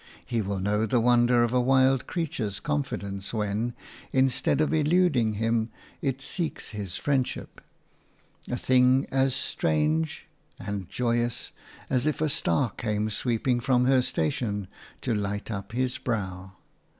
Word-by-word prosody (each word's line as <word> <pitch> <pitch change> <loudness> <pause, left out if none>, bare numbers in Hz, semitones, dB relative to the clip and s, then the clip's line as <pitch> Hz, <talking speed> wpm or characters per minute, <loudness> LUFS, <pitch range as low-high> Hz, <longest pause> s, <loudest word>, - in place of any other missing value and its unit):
He 115 -2 -1
will 100 -1 -2
know 105 +3 +1
the 120 +3 +2
wonder 120 0 +4
of 120 0 0
a 125 - +4
wild 130 +1 +3
creature's 125 - -2
confidence 105 -9 -3
when, 110 +3 -1 0.4
instead 130 +1 +2
of 155 +1 +2
eluding 150 -7 +3
him, 115 +1 0 0.3
it 135 -1 -1
seeks 160 +4 -3
his 100 -5 -5
friendship 135 -3 -2 0.4
– - - -23
a 125 - -1
thing 130 +1 +4
as 135 -1 +2
strange 80 0 0 0.3
and 100 -3 -5
joyous 120 -1 -1 0.4
as 130 +2 +1
if 155 - 0
a 155 0 +1
star 140 -4 +1
came 105 0 -2
sweeping 120 +3 0
from 125 +1 +2
her 130 0 +5
station 100 0 -1 0.3
to 125 - 0
light 105 +1 -2
upon 100 +3 -5
his 130 0 0
brow. 95 -5 -3
120 Hz, 140 wpm, -27 LUFS, 105-130 Hz, 0.4 s, her